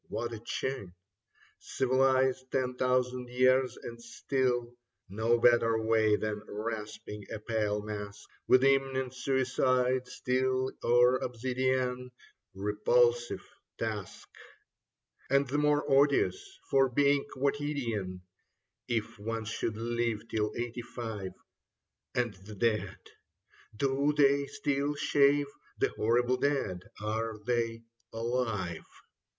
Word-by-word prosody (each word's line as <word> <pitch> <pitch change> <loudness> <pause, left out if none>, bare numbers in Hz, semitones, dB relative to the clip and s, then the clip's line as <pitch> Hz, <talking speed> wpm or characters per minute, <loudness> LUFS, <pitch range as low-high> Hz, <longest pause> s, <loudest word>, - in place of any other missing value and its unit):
What 120 0 -3
a 110 - -6
chin! 120 -4 -4 0.6
Civilized 130 0 +1
ten 130 -1 0
thousand 125 0 0
years, 130 +1 +3
and 115 0 -8
still 120 0 -1 0.4
No 110 +4 +2
better 115 -1 +4
way 110 -1 +3
than 105 -1 -3
rasping 105 -1 -6
a - - -3
pale 105 -1 -1
mask 105 -1 -7 0.2
With 130 +1 +6
imminent 135 -2 +2
suicide, 130 -1 +1
steel 130 +1 0
or 125 +1 +5
obsidian: 125 +1 -1 0.5
Repulsive 485 0 +2 0.3
task! - - -5 1.0
And 140 0 +3
the 145 +3 0
more 150 0 +2
odious 150 - +2
for 135 -1 +4
being 140 +2 +3
quotidian. 130 -10 -2 0.6
If 115 -4 -2
one 115 +1 -3
should 110 0 -3
live 115 -1 -2
till 105 -1 0
eighty 120 0 -3
five... 110 -5 -6 0.8
And 120 -3 0
the 100 +3 -12
dead, 105 -3 0 0.8
do 140 +4 +1
they 140 -1 +4
still 145 +1 -1
shave 145 0 +3
^ - - -15 0.3
The - - +2
horrible 120 +3 +1
dead, 130 -12 -1
are 110 +1 -2
they 115 -1 -1 0.3
alive 115 -7 -2
125 Hz, 110 wpm, -30 LUFS, 110-135 Hz, 1.0 s, With